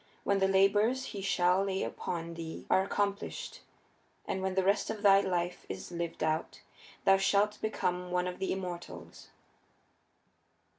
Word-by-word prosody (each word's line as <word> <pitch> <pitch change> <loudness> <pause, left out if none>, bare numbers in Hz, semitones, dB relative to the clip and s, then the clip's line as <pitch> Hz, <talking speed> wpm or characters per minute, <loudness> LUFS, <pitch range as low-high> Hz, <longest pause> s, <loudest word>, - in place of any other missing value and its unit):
When 200 -1 +2
the 195 - +3
labors 205 +7 +3
he 200 - -5
shall 185 0 +2
lay 195 -1 -1
upon 170 -1 -4
thee 165 -1 -7
are 190 - +5
accomplished, 200 - -3 0.6
and 190 - -2
when 190 0 -1
the 190 - +2
rest 200 +2 +2
of 215 -1 -4
thy 195 -1 +7
life 175 -2 -2
is 95 - -6
lived 170 -2 -4
out, 155 +1 -1 0.4
thou 195 0 +6
shalt 200 +2 +2
become 180 -4 -1
one 180 0 0
of 180 0 -5
the 190 - -1
immortals." 180 -2 -6
190 Hz, 150 wpm, -31 LUFS, 180-200 Hz, 0.6 s, thy